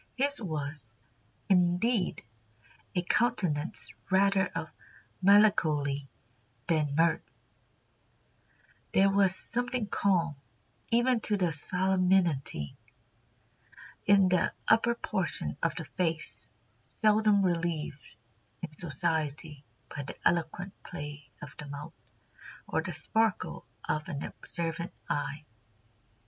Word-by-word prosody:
His 280 0 +2
was, 145 - -5 0.5
indeed, 185 +3 +2 0.7
a 180 - +1
countenance 180 -8 +1 0.2
rather 195 0 +3
of 165 -1 -4 0.5
melancholy 155 -9 +4 0.6
than 155 -4 0
mirth; 165 +1 +3 1.7
there 195 +1 +5
was 195 -1 +4
something 245 +1 +1
calm, 180 -6 +1 0.5
even 240 +1 +3
to 195 -6 +1
solemnity, 180 - +1 1.3
in 200 -2 +6
the 180 -2 +2 0.2
upper 235 +2 +4
portion - - -1
of - - 0
the - - -4
face, 165 -4 -2 0.4
seldom 210 +7 +3
relieved, 165 -5 -1 0.6
in - - -5
society, 150 -2 -2 0.3
by 145 - -3
the 140 - -6
eloquent 175 +2 -1
play 150 -3 -8
of 145 - -10
the 150 - -7
mouth, 145 +3 -8 0.7
or - - -1
the - - -5
sparkle 225 0 0 0.2
of 155 0 -2
an 145 - -4
observant 170 0 -1
eye. 145 +1 -3
175 Hz, 95 wpm, -30 LUFS, 150-200 Hz, 1.7 s, in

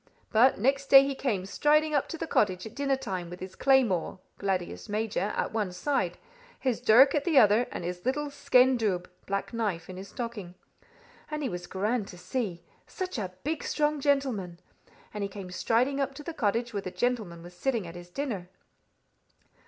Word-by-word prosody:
But 245 +4 +5
next 275 +5 +1
day 270 -1 +9
he 275 0 -1
came 225 -9 -1
striding 305 +8 +2
up 285 - +1
to 330 - -5
the 330 - -3
cottage, 185 - +1
at 220 - -8
dinner 280 -1 +1
time, 190 -10 -5
with 180 +1 -8
his 185 0 -7
claymore 250 -12 +2 0.2
(gladius 190 +1 -2
major) 210 -1 -1
at - - -1
one 210 -4 -1
side, 275 +11 -1 0.4
his 250 -3 -1
dirk 250 +4 +7
at 290 - +1
the 320 -3 +2
other, 220 +1 +6
and - - -5
his 180 +1 -5
little 285 +3 -1
skene 260 -3 +4
dubh 185 -5 0 0.2
(black 200 +4 -2
knife) 200 -7 -2
in 185 - -9
his 190 +1 -8
stocking. 215 -8 -6 0.7
And 300 0 -3
he 265 - 0
was 175 -2 -6
grand 210 +3 -1
to 180 - -11
see 180 -4 -3 0.2
such 370 - -4
a 185 -3 -4
big 310 +2 -2
strong 300 0 0
gentleman 260 -12 0
I - - -34 0.2
And 210 -1 -3
he - - 0
came 195 -3 -8
striding 250 +8 +1
up 275 0 -1
to 295 - -8
the 335 - -5
cottage 235 -2 0
where 200 - -2
the 185 - -8
shepherd 245 0 +2 0.2
was 175 +1 -11
sitting 230 +1 -1
at 170 - -8
his 175 0 -10
dinner. 200 -6 -4
230 Hz, 195 wpm, -28 LUFS, 190-275 Hz, 0.7 s, day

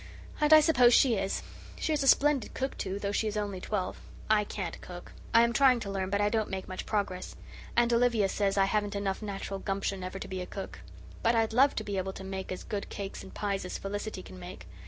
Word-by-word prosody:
"And 300 0 +2
I 310 0 +10
suppose 250 -6 +5
she 255 -4 +5
is. 195 -2 -1 0.4
She 315 - 0
is 295 - 0
a 275 - 0
splendid 285 -3 +4
cook, 265 +1 -2
too, 190 +1 -3
though 200 0 -2
she 215 +2 0
is 215 0 -2
only 200 -3 -3
twelve. 190 -3 -3 0.3
I 210 -1 +5
can't 190 -4 -5
cook. 175 -1 -9 0.2
I 230 0 +6
am 235 0 +2
trying 260 -2 +5
to 200 - -4
learn, 190 -1 -2
but 200 +1 0
I 205 - +3
don't 215 0 0
make 190 0 -4
much 185 0 -6
progress. 200 -4 -2 0.4
Aunt 240 0 +4
Olivia 235 -4 +3
says 195 0 0
I 195 - +5
haven't 205 0 0
enough 200 0 -2
natural 195 -1 -4
gumption 195 -1 -2
ever 185 +1 -5
to - - -6
be 185 -1 -4
a 180 - -5
cook; 195 - -7 0.4
but 230 +1 +3
I'd 225 -1 +2
love 270 +4 +5
to 215 - -2
be 200 -2 -2
able 190 +1 -3
to 190 - -8
make 190 0 -5
as 185 - -5
good 205 -1 -4
cakes 200 -1 -6
and 190 - -11
pies 200 -2 -2
as 180 - -4
Felicity 205 -1 -5
can 95 - -11
make. 90 -1 -9
205 Hz, 240 wpm, -30 LUFS, 190-230 Hz, 0.4 s, I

